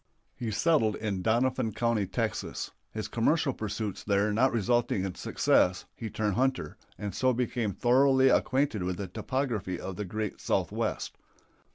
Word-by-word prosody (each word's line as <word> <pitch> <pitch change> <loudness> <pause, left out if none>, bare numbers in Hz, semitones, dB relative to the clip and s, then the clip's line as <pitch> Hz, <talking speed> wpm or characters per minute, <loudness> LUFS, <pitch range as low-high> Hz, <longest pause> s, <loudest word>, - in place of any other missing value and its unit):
He 120 - -4
settled 110 0 +2
in 100 -4 -2
Doniphan 120 +1 +1
County, 115 -4 +1
Texas. 90 - -3 0.2
His 110 -1 -4
commercial 140 +4 +1
pursuits 105 -2 -4
there 105 +1 +2
not 130 +5 +3
resulting 115 -3 +1
in 95 - -3
success 90 0 +2
he 115 - -5
turned 105 -2 -1
hunter, 130 +5 0 0.2
and 105 -1 -4
so 130 0 +2
became 120 -3 -1
thoroughly 130 +3 +4
acquainted 130 -7 +2
with 90 0 -2
the 100 - -4
topography 110 -3 -2
of 95 -2 -6
the 105 - -3
great 105 +2 -4
Southwest. - - -1
110 Hz, 150 wpm, -29 LUFS, 100-130 Hz, 0.2 s, thoroughly